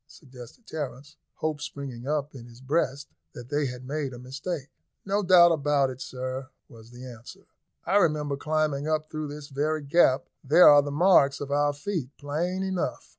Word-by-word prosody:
suggested 130 - -14
Terence, 140 -2 -7 0.2
hope 155 -1 -3
springing 135 -4 -7
up 150 -1 -2
in 120 -3 -11
his 120 0 -15
breast 140 0 -1 0.3
that 120 0 -10
they 145 -1 0
had 125 0 -8
made 140 -1 -3
a - - -8
mistake. 140 +4 -6 0.3
"No 200 +1 0
doubt 175 -2 +7
about 145 -3 +1
it, 130 0 -10
sir," 130 +1 -5 0.2
was 115 -1 -15
the 125 +1 -11
answer; 120 -2 -12 0.4
"I 190 +4 +3
remember 150 -6 +1
climbing 150 -1 -1
up 155 0 -1
through 155 -1 -4
this 145 0 -9
very 150 +2 -1
gap; 140 -3 +3 0.2
there 150 +6 +7
are 145 -1 +8
the 145 - -5
marks 145 -3 +4
of 140 -1 -6
our 145 0 +2
feet 145 -2 -4
plain 170 +6 -2
enough." 190 -2 -3
145 Hz, 175 wpm, -26 LUFS, 130-155 Hz, 0.4 s, are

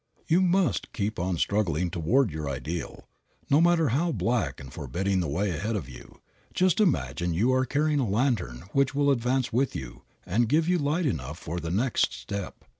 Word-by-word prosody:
You 170 +3 +3
must 185 0 +1
keep 105 -2 -2
on 90 0 -1
struggling 90 -3 0
toward 100 - +2
your 75 -1 -4
ideal. 75 +6 -5 0.4
No 145 +3 +6
matter 170 -3 +4
how 160 +9 +1
black 120 -6 -1
and 65 -1 -10
forbidding 95 +2 -1
the 85 - -1
way 95 +8 -1
ahead 100 +8 -2
of 85 -11 -3
you, 65 -2 -13 0.3
just 185 +2 +3
imagine 90 - +1
you 120 +9 +2
are 130 0 +2
carrying 150 +2 +1
a 125 -6 0
lantern 100 - 0
which 140 0 +2
will 145 0 +3
advance 125 -1 0
with 130 +3 +1
you - - -7 0.2
and 110 +5 +1
give 155 +4 +3
light 170 -1 +1
enough 75 - -2
for 85 +1 -5
the 80 - -5
next 110 +8 +1
step. 95 +11 -6
110 Hz, 185 wpm, -27 LUFS, 85-140 Hz, 0.4 s, No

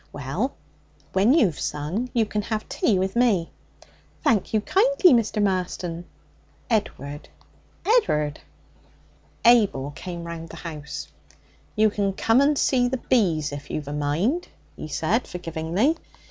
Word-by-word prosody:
'Well, 145 - -3 0.6
when 200 +5 +4
you've 220 - +3
sung, 170 +12 -3
you 230 -2 +2
can 210 0 -2
have 215 +1 -3
tea 205 - +1
with 190 +2 -1
me.' 220 -9 +2 0.7
'Thank 215 -5 +2
you 220 - +3
kindly, 400 - +4
Mr. 230 -3 +1
Marston.' 180 -3 -2 0.7
'Edward.' 145 - -2 0.6
'Ed'ard.' 150 - +2 1.1
Abel 205 - +4
came 170 +3 -7
round 165 -1 -7
the - - -9
house. 155 -3 -7 0.7
'You 215 -1 +4
can 200 -1 0
come 225 +6 +3
and 290 +1 +3
see 250 -2 +3
the 260 +1 -1
bees, 175 - +1
if 145 0 -8
you've 150 -2 -4
a 145 - -4
mind,' 165 - 0 0.3
he - - -7
said 195 +10 0
forgivingly. 175 - -1
195 Hz, 130 wpm, -24 LUFS, 160-235 Hz, 1.1 s, when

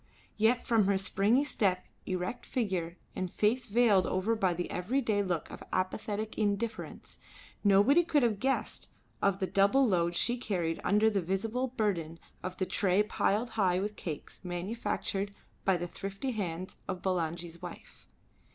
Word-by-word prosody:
Yet 225 +3 +2
from 225 -4 +4
her 200 -1 +3
springy 200 +7 +2
step, 190 -10 +1 0.2
erect 185 +5 -2
figure, 185 -8 -1 0.2
and 185 -1 -2
face 235 +4 +1
veiled 210 -4 +4
over 195 +5 +1
by 190 -5 +1
the 175 - -3
everyday 215 +2 +1
look 180 -5 -2
of - - -9
apathetic 210 +4 -2
indifference, 215 +2 -2 0.4
nobody 205 - +6
could 300 -5 +2
have 220 -4 +2
guessed 270 +3 -1 0.3
of 200 -1 +3
the 195 - 0
double 200 +8 +4
load 170 -4 +1
she 240 +7 +2
carried 175 -8 -1
under 210 +2 +4
the 200 -2 +1
visible 215 +8 -1
burden 195 -10 -1 0.2
of 185 0 -5
the 185 - 0
tray 195 +1 +2
piled 215 +2 0
up - - -14
high 185 -4 +2
with 210 +2 -3
cakes 155 -4 -6
manufactured 195 +2 -2 0.3
by 190 -2 +4
the 175 - -3
thrifty 195 +8 -4
hands 185 -5 -4
of 185 -2 -4
Bulangi's 170 -2 -2
wives. - - -10
200 Hz, 155 wpm, -31 LUFS, 180-220 Hz, 0.4 s, nobody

